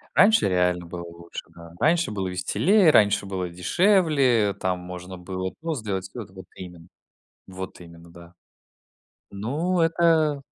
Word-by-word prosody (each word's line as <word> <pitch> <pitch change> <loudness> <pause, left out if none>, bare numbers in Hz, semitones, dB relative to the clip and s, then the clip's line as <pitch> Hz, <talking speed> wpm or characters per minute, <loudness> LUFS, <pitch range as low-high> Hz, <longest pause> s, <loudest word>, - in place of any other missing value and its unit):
Раньше 220 - +5
реально 90 -1 +1
было 85 +1 -7
лучше, 85 0 -9
да, 85 -1 -13
раньше 165 -2 +2
было 95 -3 -3
веселее, 160 - +3
раньше 105 -5 +3
было 95 -2 -4
дешевле, 135 - +2
там 95 -1 -2
можно 90 +1 -9
было 95 +1 -5
просто 160 -5 -3
сделать 95 -3 -3
всё 120 +5 -8
это, 95 -3 -12
вот 95 -1 -11
именно, 90 -2 -11 0.6
вот 95 0 -8
именно, 85 -1 -14
да. 85 0 -15 1.0
Ну, 150 - -2
это 165 -3 +2
95 Hz, 140 wpm, -24 LUFS, -, 1.0 s, Раньше